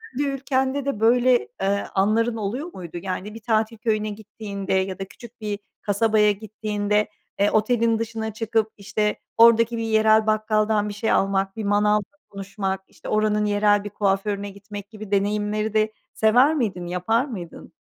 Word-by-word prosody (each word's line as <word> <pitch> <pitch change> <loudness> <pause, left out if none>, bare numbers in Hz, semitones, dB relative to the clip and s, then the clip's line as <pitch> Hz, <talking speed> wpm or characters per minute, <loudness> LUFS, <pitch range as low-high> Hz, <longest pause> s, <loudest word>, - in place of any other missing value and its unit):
kendi 285 +2 0
ülkende 275 0 -1
de 280 -7 -2
böyle, 245 +2 +4
eee, 200 +1 0
anların 220 +4 +2
oluyor 245 - -4
muydu? 175 -2 -8
Yani 190 +2 -4
bir 225 - -8
tatil 220 0 0
köyüne 215 -1 0
gittiğinde 205 -2 -6
ya 190 0 0
da 195 - -3
küçük 235 +4 -14
bir 205 -1 -3 0.2
kasabaya 210 +1 +3
gittiğinde, 210 0 -1 0.3
eee, 200 +1 +3
otelin 225 +1 +2
dışına 225 -1 -4
çıkıp 220 0 0
işte, 210 +1 -1 0.2
oradaki 230 0 +6
bir 230 - -2
yerel 220 0 +4
bakkaldan 215 -1 +1
bir - - -5
şey 210 +2 -1
almak, 195 0 +1
bir 220 - -4
manavla 210 +1 +2 0.3
konuşmak 195 -1 -4
işte, - - -11
oranın 215 0 +2
yerel 205 0 +3
bir 205 - -5
kuaförüne 200 0 -1
gitmek 200 0 -9
gibi 215 -2 -10
deneyimleri 210 +1 0
de 215 0 +1 0.2
sever 250 +8 +4
miydin? 200 - -2
Yapar 200 +8 +1
mıydın? 185 - -9
215 Hz, 160 wpm, -23 LUFS, 200-225 Hz, 0.3 s, oradaki